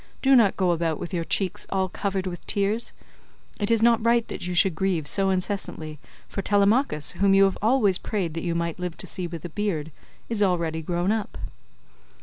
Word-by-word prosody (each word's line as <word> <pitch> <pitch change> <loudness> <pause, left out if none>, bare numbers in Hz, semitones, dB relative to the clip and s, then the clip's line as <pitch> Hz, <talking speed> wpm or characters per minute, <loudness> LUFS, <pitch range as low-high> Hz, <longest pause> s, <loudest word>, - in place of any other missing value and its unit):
Do 270 0 +6
not 220 -6 +4
go 185 -2 +2
about 165 -2 -1
with 175 +2 -6
your 170 -2 -1
cheeks 185 +2 -1
all 190 -1 0
covered 195 0 -3
with 175 -2 -6
tears; 205 +3 0 0.7
it 205 - -1
is 225 -1 +3
not 230 -1 +4
right 235 0 +3
that - - -5
you 180 - -3
should 185 +1 +5
grieve 175 -2 -1
so 195 +5 +2
incessantly; 185 -5 -3 0.3
for 195 - -4
Telemachus, 205 - +2
whom 195 +2 +2
you 195 0 +5
always 215 -4 +3
prayed 185 -7 -3
that 165 - -4
you 170 -2 -1
might 170 0 -2
live 180 -2 -4
to - - -5
see 180 -2 -4
with 170 -2 -8
a - - -5
beard, 160 -5 -2 0.4
is 225 -3 -1
already 170 -4 +1
grown 175 +4 -1
up." 220 -1 -3
190 Hz, 195 wpm, -25 LUFS, 170-205 Hz, 0.7 s, Do